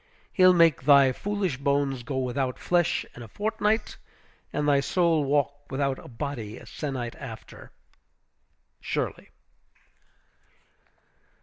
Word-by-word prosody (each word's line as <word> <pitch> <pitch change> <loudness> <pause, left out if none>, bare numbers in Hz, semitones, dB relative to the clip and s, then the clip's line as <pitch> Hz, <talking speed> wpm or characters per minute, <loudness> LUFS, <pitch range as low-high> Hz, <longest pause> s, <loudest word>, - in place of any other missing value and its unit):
He'll 185 -1 +6
make 165 -6 +4
thy 140 -1 +6
foolish 195 -1 -2
bones 140 -1 0
go 130 +3 -4
without 130 0 -1
flesh 175 -2 +1
in 120 - -10
a 115 - -8
fortnight, 215 - -1 0.5
and 150 - -1
thy 140 -1 +4
soul 165 +2 +2
walk 145 0 -1
without 135 0 -1
a - - -12
body 115 -3 -5
a - - -12
sennight 130 -6 -5
after. - - -10 1.1
SHIRLEY. - - -3
140 Hz, 115 wpm, -26 LUFS, 130-170 Hz, 1.1 s, He'll